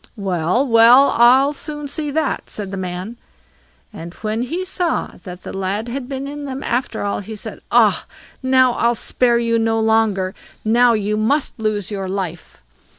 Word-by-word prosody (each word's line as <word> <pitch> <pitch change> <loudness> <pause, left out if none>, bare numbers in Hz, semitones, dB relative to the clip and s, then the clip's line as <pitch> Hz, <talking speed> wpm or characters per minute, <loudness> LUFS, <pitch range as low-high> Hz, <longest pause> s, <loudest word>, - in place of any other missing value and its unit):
"Well, 185 - 0
well; 235 +4 +6
I'll 260 +5 +5
soon 295 0 -6
see 295 +1 -4
that," 310 0 -2
said 200 -3 -6
the - - -4
man; 185 +4 -5 0.8
and 170 +2 -9
when 215 +1 -3
he 335 +9 -3
saw 355 -3 -1
that 180 -1 -9
the - - -7
lad 195 +4 -2
had 255 +1 -5
been 275 0 -4
in 290 0 -6
them 270 0 -5
after 245 +1 -2
all, 200 - -1
he 215 +2 -7
said, 210 - -9
"Ah! - - +3 0.3
now 260 -1 +4
I'll 235 0 +1
spare 240 +1 +1
you 230 -1 +1
no 225 0 +1
longer; 220 -4 +1 0.3
now 240 +2 +4
you 210 -1 -1
must 265 +5 0
lose 215 -2 -2
your 195 -2 -4
life." 180 - -5
230 Hz, 170 wpm, -19 LUFS, 200-265 Hz, 0.8 s, well